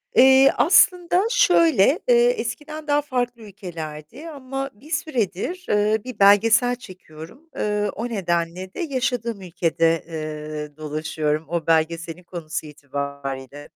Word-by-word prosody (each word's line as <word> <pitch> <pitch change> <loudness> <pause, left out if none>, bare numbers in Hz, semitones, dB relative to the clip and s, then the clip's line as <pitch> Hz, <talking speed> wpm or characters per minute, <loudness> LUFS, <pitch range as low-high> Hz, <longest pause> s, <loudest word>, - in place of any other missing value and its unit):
Eee, 265 +1 +7
aslında 360 0 +4
şöyle: 335 - +4
Eee, 480 -1 +5
eskiden 305 - -4
daha 290 0 +2
farklı 245 -4 -3
ülkelerdi 180 - -9
ama 270 -2 -5
bir 270 +10 -17
süredir, 300 - -2
ııı, 210 +1 +2
bir 255 -4 -9
belgesel 215 +5 +5
çekiyorum. 185 - -13
Iıı, 210 0 -1
o 235 +3 -4
nedenle 180 -2 -2
de - - -9
yaşadığım 250 - -2
ülkede, 165 -2 0
eee, 155 -2 -6
dolaşıyorum 155 0 -2
o 170 -2 -3
belgeselin 165 +2 0
konusu 165 -3 -6
itibariyle. 140 -1 -6
205 Hz, 120 wpm, -22 LUFS, 160-265 Hz, -, Eee